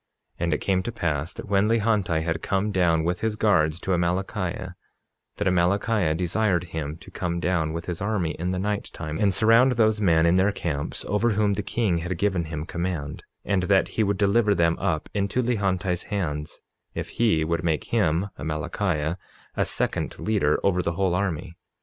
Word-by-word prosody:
47:13 - - -2
And 85 - +1
it - - -5
came 95 -2 +1
to 120 - -4
pass 85 -6 -2
that - - -8
when 100 +1 +3
Lehonti 105 -8 +1
had 80 0 -2
come 100 +2 0
down 85 -4 +2
with 90 +2 -1
his 110 -1 -1
guards 85 -7 +2
to 95 - -2
Amalickiah, 90 +1 -1 0.6
that 105 - 0
Amalickiah 90 -1 +2
desired 90 +1 +1
him 80 -3 -5
to 95 - -14
come 85 -3 -2
down 85 -2 0
with 85 +1 -5
his 90 -1 -4
army 100 -6 0
in 90 +2 -1
the 95 - -1
night 105 +2 -2
time, 75 -1 -5
and 100 -2 +3
surround 115 +6 +5
those 110 -2 +2
men 85 -4 +4
in 85 +2 +4
their 95 +2 +3
camps 75 -7 -3
over 110 +3 +1
whom 105 0 +2
the 100 - -1
king 100 -4 0
had 90 +1 -3
given 95 -3 0
him 80 -1 -5
command, 85 -5 -4 0.2
and 100 -2 +1
that 95 -1 +4
he - - -1
would 100 -1 0
deliver 105 +1 +3
them 85 -1 +3
up 80 - -1
into 100 +5 0
Lehonti's 95 -6 0
hands, 75 -7 -3 0.3
if - - -4
he 105 -10 +2
would 85 +2 -1
make 80 -3 0
him 95 -3 +2
(Amalickiah) 80 +1 -2 0.4
a - - +1
second - - -2
leader 100 -9 +1
over 90 -2 +2
the 85 -1 -1
whole 95 0 +1
army. 90 -3 -2
90 Hz, 190 wpm, -25 LUFS, 85-105 Hz, 0.6 s, surround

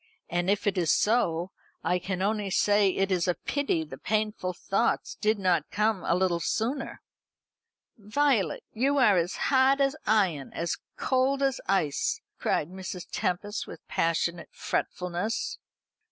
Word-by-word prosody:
And 175 +2 0
if 205 +2 +1
it 200 -2 +1
is 165 -3 +2
so 185 -6 +2 0.3
I 180 0 +1
can 185 +1 -3
only 210 0 0
say 205 +1 +3
it 195 +1 0
is 180 -1 +1
a 180 - +2
pity 280 - -1
the 150 - -10
painful 215 -3 -1
thoughts 195 +5 0
did 215 0 +1
not 185 -3 +1
come 210 -2 0
a - - +2
little 180 -2 +1
sooner." 235 - -2 1.0
"Violet, 215 - +1
you 275 +5 +1
are 215 -8 +5
as 175 +1 0
hard 270 0 +3
as 275 +1 +2
iron, 190 -10 +1
as 170 +1 -2 0.2
cold 270 +1 +1
as 270 -1 +1
ice!" 155 -8 +1 0.2
cried 150 - 0
Mrs. 185 -1 -6
Tempest, 205 +2 -2
with - - -11
passionate 170 +1 0
fretfulness. 180 +5 -2
195 Hz, 145 wpm, -28 LUFS, 175-220 Hz, 1.0 s, are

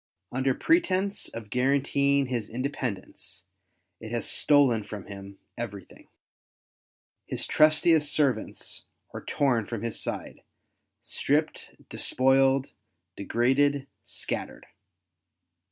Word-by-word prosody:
Under 130 +1 +1
pretence 200 - +1
of 110 -2 -9
guaranteeing 140 +2 +2
his 120 -4 -3
independence, 125 -4 -5 0.5
it 110 - -8
has 120 -1 -2
stolen 135 -7 +3
from 100 -1 -8
him 100 0 -10 0.2
everything. 105 -5 -7 1.2
His - - -2
trustiest 155 0 +4
servants 135 -7 -1 0.3
are - - -7
torn 125 -7 +1
from 115 -2 -4
his 115 -2 -2
side, - - -5 0.6
stripped, 155 +3 -1
despoiled^ 135 +1 +2 0.4
degraded, 135 +6 +2 0.2
scattered. - - -5
130 Hz, 90 wpm, -27 LUFS, 115-145 Hz, 1.2 s, trustiest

